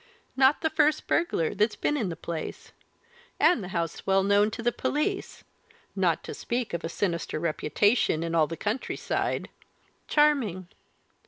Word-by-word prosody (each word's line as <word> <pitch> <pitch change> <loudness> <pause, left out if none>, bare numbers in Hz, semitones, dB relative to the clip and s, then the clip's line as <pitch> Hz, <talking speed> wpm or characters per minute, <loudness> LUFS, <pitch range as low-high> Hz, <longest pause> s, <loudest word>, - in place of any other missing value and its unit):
Not 265 +2 +4
the 320 - 0
first 310 -1 +2
burglar 255 - 0
that's 210 +2 +1
been 295 - 0
in 225 -10 -1
the 165 - -4
place! 165 -1 -6 0.7
And 305 - +4
the - - -6
house 170 -2 -3
well 195 0 +3
known 205 +1 +4
to 230 +2 -6
the 240 - +2
police 380 - -2 0.5
not - - +1
to - - -6
speak 240 -3 -3
of 170 - -3
a 165 - -3
sinister 170 -4 -2
reputation 165 - +1
in 165 0 -3
all 160 -2 +3
the 165 - -6
country 215 +5 -2
side! - - -2 0.6
Charming! 260 - +2
205 Hz, 160 wpm, -27 LUFS, 170-265 Hz, 0.7 s, Not